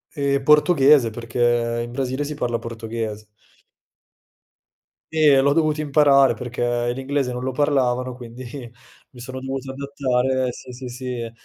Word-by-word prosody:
Ehm, 140 -2 0
portoghese, 150 -4 +5
perché 120 0 0
in 120 - -10
Brasile 130 +2 -2
si 145 +1 -4
parla 120 -5 -2
portoghese. 115 -2 -6 1.9
Sì, 160 -1 0
e 140 -2 +6
l'ho 140 +1 +3
dovuto 155 -1 +1
imparare 140 -3 +4
perché 120 0 -2
l'inglese 135 0 -2
non 125 - -5
lo 130 - -1
parlavano, 130 -3 0
quindi 125 0 -10 0.7
mi 125 - -16
sono 130 +2 -7
dovuto 135 0 -5
adattare, 130 -2 -1
sì, 125 - -11
sì, 125 +1 -8
sì, 125 -2 -5
130 Hz, 135 wpm, -22 LUFS, 120-140 Hz, 1.9 s, e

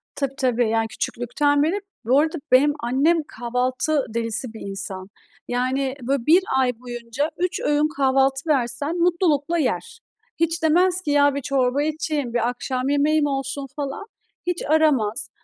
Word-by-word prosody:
Tabii, 275 -1 -2
tabii. 245 -3 +1
Yani 225 0 +1
küçüklükten 285 +6 0
beri. 345 +7 0 0.3
Bu 260 +5 +4
arada 320 +2 0
benim 285 +3 +5
annem 275 +8 +2 0.2
kahvaltı 255 +4 0
delisi 230 +1 -2
bir 220 - -10
insan. 190 -1 -6 0.4
Yani, 260 +2 -1
böyle, 255 0 -1
1 340 +5 +6 0.2
ay 255 -1 +3
boyunca 245 +4 -4
3 360 +1 -1
öğün 295 +1 +2
kahvaltı 270 +2 +2
versen 280 +4 0
mutlulukla 340 -2 +1
yer. 330 - -2 0.4
Hiç 330 0 0
demez 355 +3 +3
ki 300 -5 -2
"Ya, 285 -1 +4
bir 280 - -2
çorba 265 0 +1
içeyim, 300 -5 -2
bir 240 0 +1
akşam 255 +1 -3
yemeğim 295 +1 +2
olsun." 275 0 -3
falan, 285 +7 -4 0.4
hiç 355 -1 -1
aramaz. 290 -7 +2
275 Hz, 150 wpm, -22 LUFS, 250-310 Hz, 0.4 s, 1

